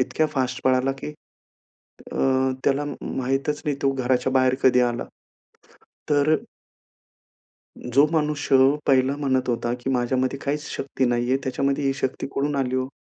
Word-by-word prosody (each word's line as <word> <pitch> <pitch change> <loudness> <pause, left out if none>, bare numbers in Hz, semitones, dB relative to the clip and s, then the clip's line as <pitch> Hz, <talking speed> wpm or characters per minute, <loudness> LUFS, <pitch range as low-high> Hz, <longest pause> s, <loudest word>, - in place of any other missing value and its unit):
इतक्या 155 +4 +1
फास्ट 130 -2 -2
पळाला, 130 +1 +2
की 145 +2 -7 1.0
अ, - - -5 0.5
त्याला 140 +1 +2
म 145 - -5 0.2
माहितच 135 +3 -1
नाही 145 -2 -1
तो 135 - +3
घराच्या 130 0 0
बाहेर 130 -1 +3
कधी 125 -1 +5
आला. 120 -1 0 1.1
तर 145 +2 +4 1.6
जो 140 +4 +6
मनुष्य 150 -3 +1 0.3
पहिला 135 +1 +3
म्हणत 130 -3 0
होता, 120 0 -1
की 135 - -3
माझ्यामध्ये 130 +1 0
काहीच 150 +2 -3
शक्ती 135 -1 -2
नाहीये 120 +1 +1
त्याच्यामध्ये 140 +2 -1
ही 135 - +2
शक्ती 135 -1 -3
कुठून 145 +1 -1
आली 130 -2 -1
हो? 130 0 -1
135 Hz, 145 wpm, -23 LUFS, 130-140 Hz, 1.6 s, जो